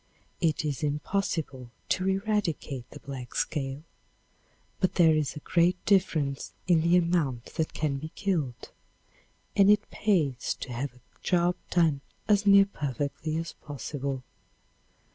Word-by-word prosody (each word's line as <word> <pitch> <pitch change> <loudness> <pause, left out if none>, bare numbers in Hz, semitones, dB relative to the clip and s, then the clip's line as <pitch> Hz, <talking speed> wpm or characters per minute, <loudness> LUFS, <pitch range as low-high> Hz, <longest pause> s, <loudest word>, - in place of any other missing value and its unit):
It 160 -3 +1
is 145 -1 -2
impossible 150 -3 -2 0.2
to 185 +1 +1
'eradicate' 190 - -1
the - - -11
black 130 -3 -7
scale, 135 -1 -2 1.0
but 185 - +1
there 165 -3 +6
is 155 -1 0
a - - -5
great 175 +2 +3
difference 160 -8 +1
in 175 -3 +4
the 170 +2 +4
amount 165 -9 0
that 160 - -2
can 150 -3 0
be 155 +3 -6
killed, 155 -11 -2 0.8
and 200 0 +6
it 210 0 +3
pays 155 - +1
to 125 - -5
have 125 +1 -4
a 125 - -20 0.2
job 175 -1 +2
done 160 -6 +3 0.3
as 205 -1 +3
near 200 0 +8
perfectly 150 - -3
as 165 +1 -4
possible. 140 -1 -5
155 Hz, 135 wpm, -28 LUFS, 140-180 Hz, 1.0 s, near